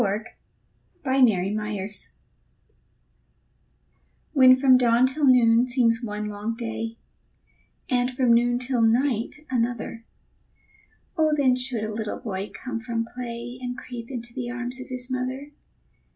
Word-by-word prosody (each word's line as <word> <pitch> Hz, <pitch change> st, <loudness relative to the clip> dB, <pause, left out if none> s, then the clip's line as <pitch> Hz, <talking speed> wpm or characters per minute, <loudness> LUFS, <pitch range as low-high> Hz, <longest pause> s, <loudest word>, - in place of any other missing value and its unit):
BREAKING 210 Hz, +1 st, -2 dB, 0.7 s
THE 265 Hz, -, -4 dB
DAY 225 Hz, -9 st, +4 dB
IN 210 Hz, -2 st, -3 dB
TWO 205 Hz, -, -9 dB, 2.2 s
When 260 Hz, -3 st, +8 dB
from 260 Hz, 0 st, +5 dB
dawn 245 Hz, 0 st, +4 dB
till 275 Hz, +3 st, 0 dB
noon 240 Hz, -1 st, +5 dB
seems 240 Hz, -2 st, +3 dB
one 210 Hz, -1 st, -4 dB
long 210 Hz, +2 st, -4 dB
day, 230 Hz, -1 st, -5 dB, 0.9 s
And 245 Hz, -1 st, +1 dB
from 255 Hz, -2 st, +2 dB
noon 240 Hz, +1 st, +3 dB
till 250 Hz, -1 st, 0 dB
night 240 Hz, +5 st, +1 dB
another, 235 Hz, -2 st, -2 dB, 1.1 s
Oh, 310 Hz, -1 st, +3 dB
then 260 Hz, -3 st, +4 dB
should 250 Hz, -3 st, -2 dB
a 215 Hz, 0 st, -3 dB
little 215 Hz, -1 st, -3 dB
boy 195 Hz, -2 st, -5 dB
come 255 Hz, -3 st, -5 dB
from 230 Hz, -1 st, -2 dB
play, 245 Hz, 0 st, -6 dB
And 245 Hz, 0 st, -4 dB
creep 245 Hz, -2 st, -8 dB
into 240 Hz, -2 st, -7 dB
the 245 Hz, -1 st, -4 dB
arms 245 Hz, +1 st, -4 dB
of 255 Hz, -, -8 dB
his 255 Hz, 0 st, -4 dB
mother. 255 Hz, +3 st, -3 dB
245 Hz, 135 wpm, -25 LUFS, 225-255 Hz, 2.2 s, When